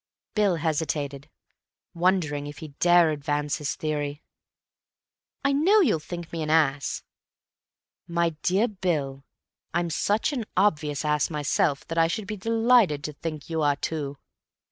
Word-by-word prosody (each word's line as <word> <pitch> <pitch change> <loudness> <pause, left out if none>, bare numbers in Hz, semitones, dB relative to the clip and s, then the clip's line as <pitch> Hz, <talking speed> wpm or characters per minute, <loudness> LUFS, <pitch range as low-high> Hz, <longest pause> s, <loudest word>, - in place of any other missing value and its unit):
Bill 205 -4 +2
hesitated, 145 -3 -2 0.6
wondering 170 -5 +1
if 145 0 -8
he 160 -3 -8
dare 175 -2 +5
advance 145 0 -1
his 150 -3 -3
theory. 150 -1 -3 1.2
"I 280 - +3
know 360 +10 +5
you'll 220 - +3
think 170 +1 -8
me 165 - -3
an 155 - -3
ass—" 145 -4 +1 1.0
"My 170 0 +1
dear 195 +6 +2
Bill, 155 - -2 0.5
I'm 170 -1 0
such 210 - +1
an 245 -5 -2
obvious 150 -7 +1
ass 150 -2 +1
myself 145 -1 0
that 165 0 -1
I 165 - +5
should 205 +5 -3
be 215 +1 -4
delighted 225 -6 +3
to 150 - -4
think 155 0 -6
you 160 -1 -2
are 145 -1 +3
too." 145 -1 -4
160 Hz, 145 wpm, -26 LUFS, 145-185 Hz, 1.2 s, dare